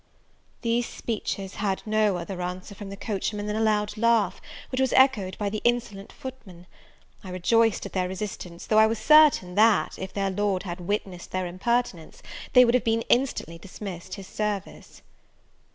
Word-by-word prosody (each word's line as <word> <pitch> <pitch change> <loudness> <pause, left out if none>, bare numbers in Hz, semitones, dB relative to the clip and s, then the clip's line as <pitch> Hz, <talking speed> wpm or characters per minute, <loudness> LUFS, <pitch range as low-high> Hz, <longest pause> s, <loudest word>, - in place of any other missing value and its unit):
These 235 +1 +1
speeches 200 -4 -4
had 195 -2 -1
no 215 -3 +2
other 180 +1 -5
answer 180 +3 -5
from 200 0 -9
the 195 - -8
coachman 205 0 -3
than 210 0 -2
a - - -1
loud 210 -1 +1
laugh, 225 -4 +2 0.3
which 255 0 0
was 265 - +1
echoed 220 -9 +3
by 205 - -2
the 210 +1 -3
insolent 235 -5 -1
footmen. 205 -10 -10 0.6
I 190 - -8
rejoiced 225 +5 +2
at - - -8
their 185 -1 0
resistance; 185 -2 -6
though 215 - +4
I 220 - +7
was 225 +1 -1
certain 300 -11 +5
that, 215 +2 +3
if 190 0 -5
their 195 -1 -1
Lord 195 -1 0
had 175 -1 -6
witnessed 185 -1 -4
their 185 0 -2
impertinence, 185 -1 -2 0.3
they 250 -1 +8
would 235 - +2
have 250 - +3
been 225 0 +1
instantly 240 - 0
dismissed 185 -1 -8
his 195 - -9
service. 205 -1 -5
205 Hz, 170 wpm, -26 LUFS, 185-230 Hz, 0.6 s, they